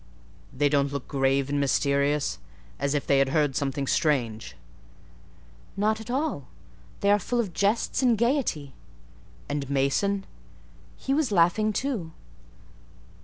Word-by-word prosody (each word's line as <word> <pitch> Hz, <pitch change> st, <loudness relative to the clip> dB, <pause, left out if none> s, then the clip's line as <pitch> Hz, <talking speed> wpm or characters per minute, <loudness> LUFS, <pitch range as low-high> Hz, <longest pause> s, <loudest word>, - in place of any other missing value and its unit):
"They 145 Hz, +2 st, +1 dB
don't 140 Hz, -1 st, +1 dB
look 140 Hz, -2 st, -5 dB
grave 135 Hz, 0 st, +1 dB
and 145 Hz, 0 st, -1 dB
mysterious, 140 Hz, +1 st, +1 dB, 0.4 s
as 140 Hz, +1 st, 0 dB
if 145 Hz, -, -1 dB
they 140 Hz, -, +3 dB
had 135 Hz, -1 st, +3 dB
heard 145 Hz, -2 st, +1 dB
something 140 Hz, -1 st, -1 dB
strange?" 120 Hz, -7 st, 0 dB, 1.2 s
"Not 215 Hz, +2 st, +1 dB
at 220 Hz, -, -11 dB
all: 265 Hz, -, -2 dB, 0.5 s
they 200 Hz, -, +3 dB
are 205 Hz, -, +4 dB
full 240 Hz, +5 st, -2 dB
of 205 Hz, -7 st, -2 dB
jests 205 Hz, +9 st, +1 dB
and 245 Hz, -3 st, +3 dB
gaiety." 230 Hz, -, 0 dB, 0.7 s
"And 140 Hz, -2 st, -3 dB
Mason?" 140 Hz, +9 st, 0 dB, 0.7 s
"He 270 Hz, -, -2 dB
was 290 Hz, -5 st, +1 dB
laughing 200 Hz, +4 st, +3 dB
too." 210 Hz, -, -3 dB
150 Hz, 130 wpm, -26 LUFS, 140-215 Hz, 1.2 s, are